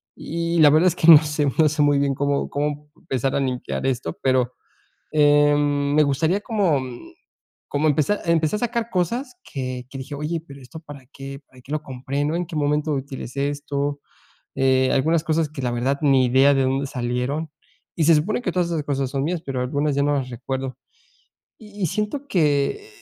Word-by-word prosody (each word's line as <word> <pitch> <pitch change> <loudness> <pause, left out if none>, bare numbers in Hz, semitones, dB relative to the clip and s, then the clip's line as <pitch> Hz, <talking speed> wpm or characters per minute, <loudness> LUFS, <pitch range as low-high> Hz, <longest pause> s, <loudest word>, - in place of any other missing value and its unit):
y 170 +1 -3
la 150 - +8
verdad 160 +4 +4
es 180 - +2
que 165 - 0
no 155 - +12
sé 150 -1 -1
no 155 - +6
sé 150 0 -1
muy 145 -1 +3
bien 140 -1 +1
cómo 140 +1 -1
cómo 150 +1 -3
empezar 135 +1 -2
a - - +2
limpiar 130 0 -3
esto, 120 -11 -2
pero, 130 -2 +2 0.6
em, 145 -1 +3
me 150 - +5
gustaría 160 +7 +1
como, 200 - +1
mm, 125 -2 -9 0.6
como 145 +2 +1
empeza 155 +8 +1
Empecé 165 +1 +2
a - - -6
sacar 235 -1 -2
cosas 235 - -2 0.2
que 130 -2 -4
que 135 - -8
dije: 145 +2 -7
"Oye, 155 +3 -3
pero, 140 0 -11
¿esto 130 +5 -11
para 145 -4 -12
qué? 135 0 -8
¿Para 130 -1 -18
que 130 - -13
lo 155 0 -1
compré, 135 +1 -3
no? 155 +3 -1
¿En 175 0 -1
qué 170 - -8
momento 150 +1 0
utilicé 140 0 -3
esto?", 145 0 -3 0.6
eh, 130 -1 +3
algunas 160 +4 +2
cosas 160 -1 +1
que 150 -3 -7
la 125 - 0
verdad, 130 +4 0
ni 135 -3 +4
idea 135 +3 +5
de 135 - +2
dónde 135 +1 0
salieron 125 +4 -3 0.5
y 165 - +1
se 165 +2 +6
supone 200 +11 0
que 185 - -2
todas 175 -1 0
esas 160 -4 -2
cosas 135 -2 -2
son 135 -1 -2
mías, 170 +1 -2
pero 135 -2 -3
algunas 145 +3 -1
ya 140 - +2
no 145 - +2
las 135 -3 -2
recuerdo. 130 +1 -5 0.8
Y 210 -2 -10
y - - +3
siento 215 - -3
que 155 - +1
145 Hz, 200 wpm, -22 LUFS, 135-160 Hz, 0.8 s, no